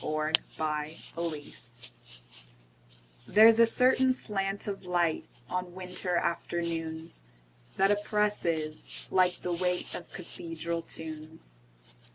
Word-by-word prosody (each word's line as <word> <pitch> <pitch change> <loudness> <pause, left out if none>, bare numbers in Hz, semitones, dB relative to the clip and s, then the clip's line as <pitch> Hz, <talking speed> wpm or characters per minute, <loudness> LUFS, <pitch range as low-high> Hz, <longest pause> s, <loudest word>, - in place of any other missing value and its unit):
Part 155 +1 -1 0.2
Two: - - -2
Nature 150 0 -1 0.2
LXXXII 160 -4 -3 1.7
THERE'S 225 +2 +7
a 230 - +8
certain 255 +2 +4
slant 195 -4 -2
of 200 -2 -4
light, 175 -3 +1 0.2
On 180 +2 -3
winter 180 -1 -2
afternoons, 165 - -2 0.6
That 195 +1 +5
oppresses, 205 -7 0
like 180 -1 +3
the 180 - 0
weightOf 180 -1 -1
cathedral 170 -1 -4
tunes. 155 - -7
175 Hz, 100 wpm, -30 LUFS, 160-195 Hz, 1.7 s, a